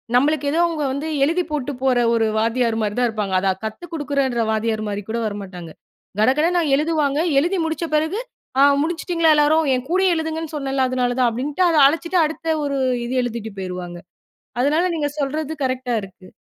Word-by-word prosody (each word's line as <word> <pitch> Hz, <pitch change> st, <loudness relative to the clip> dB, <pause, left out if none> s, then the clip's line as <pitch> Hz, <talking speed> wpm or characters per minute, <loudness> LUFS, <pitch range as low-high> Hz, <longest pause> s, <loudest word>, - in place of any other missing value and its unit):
நம்மளுக்கு 285 Hz, +2 st, +2 dB
ஏதோ 325 Hz, -, 0 dB
அவங்க 315 Hz, -3 st, -3 dB
வந்து 285 Hz, +3 st, -4 dB, 0.2 s
எழுதி 340 Hz, +4 st, +1 dB
போட்டு 290 Hz, -1 st, -2 dB
போற 255 Hz, -2 st, +3 dB
ஒரு 225 Hz, -1 st, +2 dB
வாத்தியார் 230 Hz, 0 st, +1 dB
மாதிரி 210 Hz, 0 st, -2 dB
தான் 245 Hz, -, +3 dB
இருப்பாங்க, 210 Hz, -4 st, -2 dB
அதை 195 Hz, 0 st, +2 dB
கத்து 220 Hz, +11 st, -6 dB
குடுக்குற 275 Hz, -6 st, 0 dB
வாத்தியார் 220 Hz, -1 st, -1 dB
மாதிரி 205 Hz, 0 st, -4 dB
கூட 230 Hz, -, -1 dB
வரமாட்டாங்க, 185 Hz, -5 st, -7 dB, 0.5 s
கடகடன்னு 315 Hz, +9 st, +3 dB
எழுதுவாங்க, 300 Hz, -2 st, 0 dB, 0.2 s
எழுதி 355 Hz, +5 st, 0 dB
முடிச்ச 320 Hz, +1 st, -2 dB
பிறகு, 320 Hz, +7 st, 0 dB, 0.4 s
ஆ -, -, +6 dB, 0.2 s
முடிச்சுட்டீங்களா 335 Hz, -1 st, +1 dB
எல்லாரும், 310 Hz, +2 st, +3 dB
என் 255 Hz, +2 st, -4 dB
கூடயே 375 Hz, 0 st, +3 dB
எழுதுங்கனு 320 Hz, 0 st, -4 dB
சொன்னேல்ல 270 Hz, -2 st, 0 dB
அதனால 250 Hz, -1 st, 0 dB
தான், 245 Hz, -, +4 dB
அப்படின்ட்டு 290 Hz, +9 st, -1 dB
அதை 320 Hz, -2 st, +3 dB
அழிச்சிட்டு 335 Hz, +4 st, 0 dB
அடுத்த 320 Hz, +1 st, -2 dB
ஒரு 280 Hz, -1 st, -1 dB, 0.3 s
இது 255 Hz, +2 st, -3 dB
எழுதிட்டு 230 Hz, -2 st, -4 dB
போய்டுவாங்க, 180 Hz, -2 st, -6 dB, 0.6 s
அதனால 300 Hz, +7 st, +2 dB
நீங்க 295 Hz, -3 st, -1 dB
சொல்றது 300 Hz, +2 st, -2 dB
கரெக்ட்டா 255 Hz, -1 st, -2 dB
இருக்கு. 190 Hz, -1 st, -13 dB
280 Hz, 170 wpm, -21 LUFS, 230-320 Hz, 0.6 s, ஆ